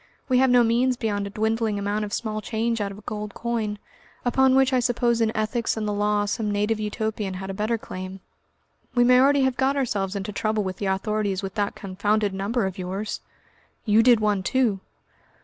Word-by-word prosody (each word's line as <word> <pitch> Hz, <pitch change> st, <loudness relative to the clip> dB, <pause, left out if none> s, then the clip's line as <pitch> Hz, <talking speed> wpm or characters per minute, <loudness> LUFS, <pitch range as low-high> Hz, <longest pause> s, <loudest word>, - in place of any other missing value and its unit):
We 255 Hz, -2 st, +3 dB
have 265 Hz, 0 st, +4 dB
no 245 Hz, -1 st, +6 dB
means 245 Hz, +2 st, +2 dB
beyond 205 Hz, -3 st, -1 dB
a -, -, -6 dB
dwindling 220 Hz, 0 st, 0 dB
amount 205 Hz, +1 st, -1 dB
of 205 Hz, -, -8 dB
small 215 Hz, 0 st, -2 dB
change 230 Hz, +1 st, -1 dB
out 200 Hz, -1 st, -2 dB
of 200 Hz, -, -10 dB
a -, -, -12 dB
gold 210 Hz, -1 st, -5 dB
coin, 225 Hz, -3 st, -2 dB, 0.5 s
upon 265 Hz, +2 st, +4 dB
which 265 Hz, 0 st, +4 dB
I 255 Hz, -, +4 dB
suppose 240 Hz, -1 st, +1 dB
in 220 Hz, -1 st, +2 dB
ethics 220 Hz, +2 st, -1 dB
and 215 Hz, -1 st, -2 dB
the 210 Hz, -, -1 dB
law 205 Hz, 0 st, +1 dB
some 210 Hz, +1 st, -2 dB
native 210 Hz, +2 st, 0 dB
Utopian 210 Hz, -2 st, -3 dB
had 190 Hz, +1 st, -5 dB
a -, -, -5 dB
better 215 Hz, +4 st, -1 dB
claim. 185 Hz, -2 st, -7 dB, 0.8 s
We 245 Hz, -, +5 dB
may 250 Hz, +1 st, +6 dB
already 280 Hz, 0 st, +4 dB
have 265 Hz, -1 st, +1 dB
got 270 Hz, +2 st, +1 dB
ourselves 205 Hz, -7 st, -1 dB
into 200 Hz, +1 st, -3 dB
trouble 215 Hz, +1 st, -1 dB
with 185 Hz, -1 st, -4 dB
the 200 Hz, -, -2 dB
authorities 200 Hz, 0 st, -1 dB
with 190 Hz, -1 st, -4 dB
that 205 Hz, -2 st, -1 dB
confounded 205 Hz, +1 st, -1 dB
number 200 Hz, +4 st, -1 dB
of 190 Hz, 0 st, -4 dB
yours!" 190 Hz, +4 st, -4 dB, 0.6 s
"You 215 Hz, 0 st, +5 dB
did 240 Hz, -1 st, +5 dB
one 210 Hz, -2 st, +1 dB
too!" 230 Hz, -2 st, +1 dB
215 Hz, 205 wpm, -24 LUFS, 205-235 Hz, 0.8 s, no